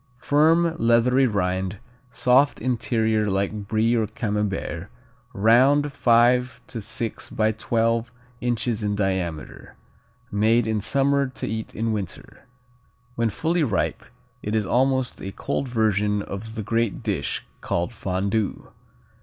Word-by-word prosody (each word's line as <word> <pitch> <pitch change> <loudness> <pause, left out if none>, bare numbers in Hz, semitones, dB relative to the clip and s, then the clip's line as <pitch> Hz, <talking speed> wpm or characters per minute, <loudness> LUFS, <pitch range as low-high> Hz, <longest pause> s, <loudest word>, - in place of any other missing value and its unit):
Firm, 160 +5 +3
leathery 120 +3 +4
rind, 95 -2 -1 0.3
soft 130 +3 +3
interior 110 -3 0
like 100 +1 -2
Brie 110 +2 +2
or 110 -2 +1
Camembert; 105 -5 -3 0.4
round, 130 +8 +4
five 125 +1 +3
to 115 - -6
six 110 +2 -4
by 110 0 +1
twelve 115 +1 0 0.3
inches 120 -2 -1
in 105 -1 -1
diameter. 95 -6 -3 0.6
Made 110 +3 +3
in 110 -1 -1
summer 140 +4 +2
to 130 - -5
eat 110 +1 -5
in 115 +1 -1
winter. 100 -5 -6 0.7
When 115 -1 0
fully 165 - 0
ripe 110 -9 -1 0.4
it 105 +1 -2
is 110 -2 +1
almost 130 +3 +1
a 95 - -5
cold 135 - -3
version 105 -3 +1
of 110 +4 -7
the 110 - -3
great 115 0 -1
dish - - -2 0.2
called 85 +7 -2
Fondue. 100 +1 -2
110 Hz, 125 wpm, -24 LUFS, 105-125 Hz, 0.7 s, leathery